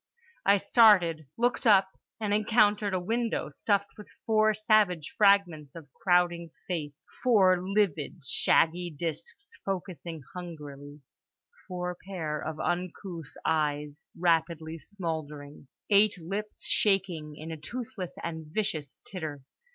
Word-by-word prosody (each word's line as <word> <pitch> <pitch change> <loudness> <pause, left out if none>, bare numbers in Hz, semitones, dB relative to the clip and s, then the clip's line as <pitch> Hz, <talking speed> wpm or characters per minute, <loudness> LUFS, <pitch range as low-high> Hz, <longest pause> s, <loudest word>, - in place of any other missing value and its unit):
I 200 +1 +6
started, 180 - +4
looked 245 +1 +1
up, 195 -3 +6 0.3
and 210 -2 -1
encountered 210 -2 +3
a - - +1
window 230 +5 -1
stuffed 200 0 -1
with 210 - -11 0.2
four 215 -1 +4
savage 210 -7 +2
fragments 180 -9 +3
of 150 -5 -12
crowding 175 -2 +1 0.2
Face: 155 -4 -5 0.2
four 190 -7 +5
livid, 185 -6 -1
shaggy 170 +6 +2
disks 165 - -6
focussing 170 -5 -5
hungrily; 150 -5 -9 0.7
four 180 -1 -4
pair 160 -6 -3
of 155 -1 -5
uncouth 175 -2 -4
eyes 150 -1 -1 0.2
rapidly 165 -1 0
smouldering; 150 -5 -6 0.2
eight 205 0 +5
lips 200 +6 -4
shaking 180 -7 +1
in 155 +2 -8
a 160 - -5
toothless 190 +1 -6
and 160 -2 -5
viscous 155 -6 -3
titter. 155 -7 -6
175 Hz, 115 wpm, -29 LUFS, 155-200 Hz, 0.7 s, I